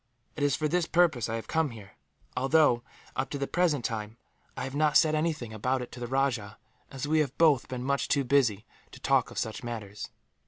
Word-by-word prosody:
It 150 - -6
is 145 -1 +3
for 155 - 0
this 170 +1 +1
purpose 160 -10 +2
I 115 - -1
have 115 - -5
come 160 -2 +1
here 105 -5 -11 0.4
although, 135 -1 +4 0.3
up 130 - -1
to 145 - -3
the 140 - -1
present 165 -6 +1
time, 110 -1 -4 0.4
I - - -3
have 135 0 -5
not 150 +1 +4
said 155 -1 +4
anything 155 -7 -1
about 125 +4 -1
it 125 - -10
to 125 - -9
the 120 - -4
rajah, 125 -6 -1 0.3
as 135 0 -5
we 155 +1 +3
have 145 -3 -1
both 155 -6 +4
been 125 -1 -5
much 140 +1 0
too 140 -1 +2
busy 120 -6 +2 0.3
to - - -11
talk - - +2
of - - -11
such 110 +2 -3
matters. 105 -4 -6
135 Hz, 220 wpm, -29 LUFS, 120-150 Hz, 0.4 s, although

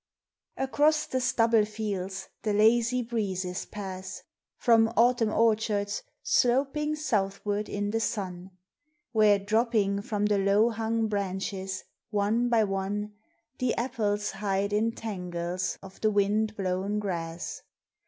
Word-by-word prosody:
ACROSS 295 +3 +2
the 260 - -2
stubble 230 -3 +3
fields 200 -3 -4
the 215 - 0
lazy 235 +4 +3
breezes 190 -6 -3
pass, 190 -2 -7 0.3
From 225 -1 +4
Autumn 235 -1 +4
orchards 215 -2 +1 0.2
sloping 285 - +2
southward 205 -6 -1
in 205 0 -2
the 225 - 0
sun, 190 -4 -3 0.6
Where 215 -2 +5
dropping 205 -1 +1
from 210 0 -1
the 205 -1 +2
low 200 +4 +3
hung 225 0 0
branches, 190 -1 -3 0.3
one 215 +3 +1
by 230 -2 +4
one, 205 +1 -2 0.5
The 255 -2 +1
apples 215 -4 -1
hide 200 0 -1
in 225 +2 +1
tangles 180 -4 -3
of 190 0 -12
the 215 - +3
wind 210 +1 +1
blown 190 +2 -1
grass. 170 -5 -4
210 Hz, 120 wpm, -28 LUFS, 195-230 Hz, 0.6 s, Where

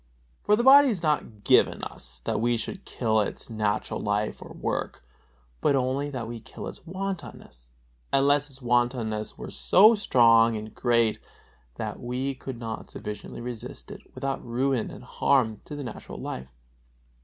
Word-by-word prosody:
For 210 - +4
the 235 - 0
body 280 +2 +9
is 200 -9 -1
not 135 -9 -1
given - - +4
us - - -7
that - - -1
we 120 0 +2
should 190 - -5
kill 110 -3 +1
its 105 - -5
natural 105 -2 -1
life 105 +1 -1
or - - -10
work, - - -3 0.6
but 140 - +3
only 135 +2 0
that 125 -5 -4
we 115 0 -6
kill - - -9
its - - -9
wantonness; 185 - -6 0.4
unless 145 +1 +3
its 135 -1 -15
wantonness 120 -3 0
were - - -7
so 215 +5 +6
strong 115 - +5
and 110 0 -7
great 115 -3 +2 0.6
that - - -5
we 130 +3 -2
could 130 -1 -7
not 115 -2 -6
sufficiently 105 +2 -7
resist 120 -2 -7
it - - -9
without 135 0 -3
ruin 125 0 0
and - - -10
harm 115 -6 +1
to 150 - -7
the 145 - -5
natural 125 - -8
life. 65 +1 -6
120 Hz, 160 wpm, -27 LUFS, 110-140 Hz, 0.6 s, body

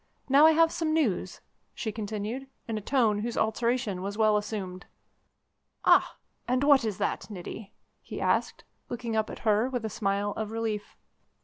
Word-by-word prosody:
Now, 280 +3 +7
I 320 - +6
have 325 +1 +4
some 315 -2 -1
news," 215 - 0 0.3
she 220 -4 -3
continued, 215 +4 -4 0.2
in 225 - -2
a 215 - -3
tone 220 -3 +2
whose 235 +3 -3
alteration 220 -3 0
was 200 +2 -4
well 215 -1 +4
assumed. 205 -3 -4 1.0
"Ah! - - +4 0.3
and 255 +2 +1
what 280 -3 +6
is 215 -4 -2
that, - - -2
Niti?" 200 +1 -8 0.3
he - - -7
asked, - - 0 0.3
looking 235 -2 -3
up 220 0 +1
at - - -9
her 215 +4 +3
with 245 -4 -3
a 220 - -3
smile 200 0 0
of 215 0 -4
relief. 220 -2 -3
220 Hz, 170 wpm, -28 LUFS, 205-250 Hz, 1.0 s, Now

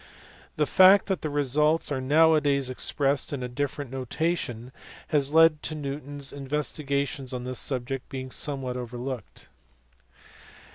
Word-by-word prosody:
The 150 - +2
fact 190 +5 +6
that 190 -2 -2
the 155 - -3
results 150 +3 +1
are 135 -2 -1
now 160 +5 +5
a 155 - +3
days 140 -3 +1
expressed 135 +2 -1
in 140 -3 -4
a - - -2
different 140 +1 -4
notation 130 -2 -3 0.4
has 145 -3 +2
led 160 -1 +5
to 155 - -3
Newton 145 -1 -6
s 140 -1 -3
investigations 140 -1 -2
on 125 -1 -4
this 125 -1 -3
subject 130 -1 -3
being 130 -1 -6
somewhat 135 -4 -3
overlooked. 125 -1 -6
140 Hz, 145 wpm, -26 LUFS, 130-150 Hz, 0.4 s, fact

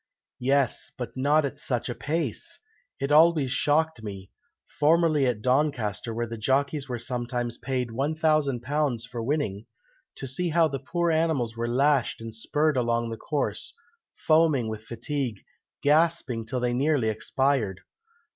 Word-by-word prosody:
"Yes, 135 0 +1
but 125 -2 -6
not 145 +3 +3
at 140 +1 -5
such 125 -5 -1
a 125 - -2
pace! 160 +7 -2 0.4
It 140 - -2
always 155 -3 +5
shocked 150 0 +1
me 100 -3 -8 0.5
formerly 155 -2 +4
at 110 -4 -1
Doncaster, 125 -6 0
where 120 +1 -2
the 115 -1 -7
jockeys 140 +4 0
were 125 - -2
sometimes 120 0 -3
paid 130 -2 -2
£1000 140 -2 0
for 125 -2 -5
winning 115 -6 -2 0.5
to - - -5
see 150 +7 -2
how 165 0 +4
the 135 -3 -4
poor 170 +6 0
animals 155 -8 +1
were 115 0 -2
lashed 135 +2 +2
and 115 -1 -7
spurred 150 +6 0
along 120 -1 0
the 115 - -5
course, 155 - -3 0.5
foaming 155 -7 +4
with 110 0 -6
fatigue, 120 -1 -3 0.4
gasping 145 -6 +2
till 125 +2 -2
they 120 0 +1
nearly 135 -2 +2
expired. 110 -3 0
130 Hz, 145 wpm, -26 LUFS, 120-150 Hz, 0.5 s, always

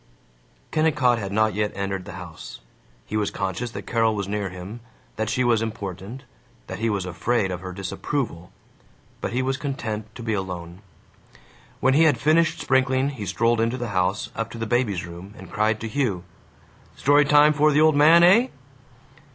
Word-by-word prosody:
Kennicott 150 -6 +2
had 100 -2 -5
not 110 +1 +2
yet 105 0 -1
entered 100 -1 -3
the - - -8
house. 85 -3 -9 0.5
He - - -6
was 105 -1 +1
conscious 100 +5 -3
that - - -8
Carol 115 -2 +1
was 100 -2 -3
near 100 -1 -2
him, 95 +5 -8 0.4
that 110 0 -2
she 125 +4 +1
was 120 -2 +3
important, 105 +2 -6 0.4
that - - -7
he 115 +1 0
was 100 -3 -1
afraid 95 +3 0
of 90 -1 -5
her 95 0 -6
disapproval; 95 - -4 0.7
but - - -3
he 125 +2 0
was 135 0 -1
content 115 -7 -4
to 120 - -8
be 110 -1 -1
alone. 90 -2 -5 1.0
When 130 +1 +4
he 160 +4 +5
had 150 -6 +4
finished 160 +5 +2
sprinkling 130 0 +2
he 115 -8 -6
strolled 115 +4 +1
into 115 +3 0
the 120 -2 -4
house, 95 +1 -1
up 115 0 -3
to 115 - -9
the 115 - -3
baby's 110 -6 0
room, 85 +4 -10
and - - -12
cried 110 0 +1
to 115 - -3
Hugh, 110 -7 -1 0.7
"Story 145 +1 +4
time 150 +1 +5
for 150 +1 +3
the 150 +1 +3
old 155 -1 +5
man, 160 +4 +7
eh?" 210 +8 +6
115 Hz, 185 wpm, -24 LUFS, 100-130 Hz, 1.0 s, man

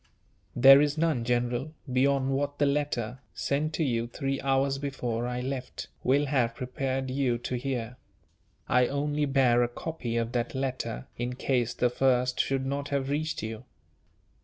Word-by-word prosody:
"There 135 +3 +9
is 150 +1 +1
none, 155 -7 +1
General, 120 +4 -1 0.2
beyond 135 +1 +2
what 145 +1 -1
the 145 - +3
letter, 140 -4 -1 0.2
sent 150 +3 -1
to 160 - 0
you 120 -4 0
three 135 +3 -3
hours 135 0 +1
before 125 -4 -2
I 125 0 -3
left, 130 0 -5
will 140 +3 +3
have 125 -5 +1
prepared 130 +1 -3
you 130 -3 +1
to 120 - -5
hear. 125 -2 -3 0.7
I 125 -1 +4
only 145 +1 0
bear 130 -3 +3
a 120 - +3
copy 120 -2 -4
of 115 0 -1
that 120 +1 -2
letter, 130 - -3
in 120 +1 -2
case 125 -3 0
the 125 -1 +1
first 125 -1 +2
should 135 -1 +1
not 140 +1 -3
have 140 -1 -1
reached 155 0 -2
you." 110 0 -6
130 Hz, 160 wpm, -28 LUFS, 120-140 Hz, 0.7 s, There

